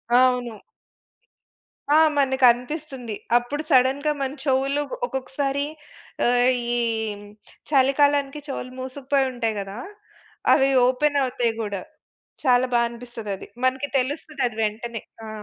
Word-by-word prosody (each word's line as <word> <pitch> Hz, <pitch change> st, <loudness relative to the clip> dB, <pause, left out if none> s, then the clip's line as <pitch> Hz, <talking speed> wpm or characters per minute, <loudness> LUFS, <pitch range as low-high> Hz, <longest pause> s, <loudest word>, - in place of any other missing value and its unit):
అవును. 250 Hz, -3 st, +3 dB, 1.4 s
ఆ! -, -, +7 dB, 0.2 s
మనకు 265 Hz, -1 st, +1 dB
అనిపిస్తుంది. 250 Hz, -1 st, -6 dB, 0.2 s
అప్పుడు 245 Hz, +5 st, -3 dB
సడెన్‌గా 270 Hz, +3 st, +4 dB
మన 270 Hz, -1 st, -1 dB
చెవులు 275 Hz, +1 st, +1 dB, 0.2 s
ఒక్కొక్కసారి, 270 Hz, +2 st, -2 dB, 0.6 s
ఆహ్, 245 Hz, +1 st, +4 dB, 0.3 s
ఈ -, -, +1 dB, 0.9 s
చలికాలానికి 280 Hz, +1 st, +3 dB
చెవులు 255 Hz, -2 st, -5 dB
మూసుకుపోయి 265 Hz, +1 st, 0 dB
ఉంటాయి 230 Hz, -3 st, -1 dB
కదా! 195 Hz, +1 st, -7 dB, 0.8 s
అవి 270 Hz, -1 st, +4 dB, 0.2 s
ఓపెన్ 285 Hz, +3 st, +1 dB
అవుతాయి 245 Hz, -3 st, 0 dB
గూడా, 200 Hz, -3 st, -3 dB, 0.6 s
చాలా 250 Hz, 0 st, +4 dB
బా 240 Hz, -, +4 dB
అనిపిస్తదది, 230 Hz, -4 st, -7 dB, 0.2 s
మనకు 265 Hz, +2 st, 0 dB
తెలుస్తది 290 Hz, +2 st, -3 dB
అది 230 Hz, -2 st, -9 dB
వెంటనే. 225 Hz, +1 st, -3 dB, 0.3 s
ఆ! -, -, -7 dB
260 Hz, 110 wpm, -24 LUFS, 240-275 Hz, 1.4 s, ఆ